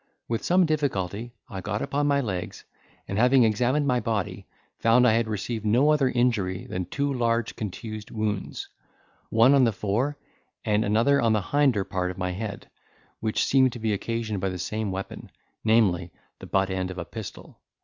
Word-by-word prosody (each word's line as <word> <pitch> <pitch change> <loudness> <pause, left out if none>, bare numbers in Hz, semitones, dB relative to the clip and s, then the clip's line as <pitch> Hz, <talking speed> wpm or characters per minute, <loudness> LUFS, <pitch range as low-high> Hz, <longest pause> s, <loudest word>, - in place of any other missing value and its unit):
With 115 -1 -2
some 180 +1 +4
difficulty 120 - -1 0.2
I 95 -6 -6
got 100 +3 -2
upon 145 +1 0
my 140 -1 +3
legs, 95 -8 -5 0.4
and 100 - -2
having 125 +1 +5
examined 125 +7 +2
my 125 -3 +2
body, 110 -6 -3 0.3
found 120 +2 +5
I 110 - +5
had 115 0 +1
received 110 +1 -3
no 125 +8 +4
other 145 -4 +3
injury 115 -7 0
than 90 0 -4
two 140 +9 -1
large 115 -2 0
contused 110 +1 -6
wounds, 105 -3 -3 0.6
one 115 +5 +5
on 140 -2 +5
the 115 - +4
fore 110 +8 -1 0.5
and 105 0 +2
another 115 +7 +3
on 115 -2 +3
the 105 -2 +1
hinder 135 -3 +2
part 90 -2 -2
of 90 - -7
my 90 -1 -2
head, 100 +2 -5 0.5
which 110 -1 0
seemed 130 -2 +4
to 120 - -7
be 110 -1 0
occasioned 110 -1 -3
by 95 - 0
the 90 - -4
same 105 +4 -3
weapon, 95 +1 -6 0.3
namely, 100 -6 +3 0.3
the - - -9
butt 95 0 +1
end 95 -1 -2
of 95 - -7
a 85 - -4
pistol. 110 +1 -9
110 Hz, 180 wpm, -26 LUFS, 100-125 Hz, 0.6 s, having